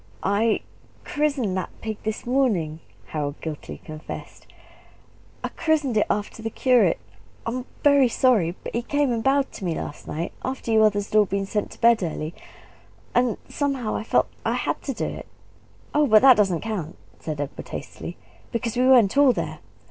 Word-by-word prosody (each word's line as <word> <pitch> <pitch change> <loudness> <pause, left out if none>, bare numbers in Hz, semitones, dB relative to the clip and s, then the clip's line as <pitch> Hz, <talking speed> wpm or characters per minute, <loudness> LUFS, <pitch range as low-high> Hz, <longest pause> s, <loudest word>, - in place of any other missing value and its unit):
"I 210 +3 +2 0.4
I - - -14
christened 280 -10 0
that 185 - -2
pig 220 -1 -4
this 220 0 -4
morning," 215 - +1 0.3
Harold 145 -1 -3
guiltily 155 -3 -6
confessed; 155 0 -9 1.0
"I - - -1
christened 305 -7 0
it 210 - +3
after 210 +2 -2
the 225 - -2
curate. 250 +1 +3 0.5
I'm 245 +2 -3 0.2
very 280 -3 +6
sorry 220 -9 +2
but - - -6
he 235 - 0
came 285 +1 +1
and 230 -1 -1
bow'ed 275 0 +2
to - - -9
me 170 -3 -1
last 145 - -6
night, 165 +4 -3
after 260 -3 -3
you 220 0 +5
others 205 -1 +2
had 215 - +5
all 210 - +5
been 195 +1 -1
sent 210 +1 -2
to - - -17
bed 235 -2 +5
early 160 -2 -3 0.8
and 245 -2 +2
somehow 270 -6 -1
I - - -2
felt - - +2 0.2
I - - 0
HAD - - -2
to - - -1
do - - -2
it!" - - -6 0.7
"Oh, 295 0 +4
but 215 0 +6
that 265 -2 +9
doesn't 195 -6 +2
count," 195 -8 -4 0.2
said 155 -2 -5
Edward 145 -1 -5
hastily; - - -7 0.3
"because 235 -1 -2
we 250 +1 +3
weren't 245 -6 +6
all 280 -3 +7
there. - - -4
220 Hz, 180 wpm, -24 LUFS, 190-255 Hz, 1.0 s, that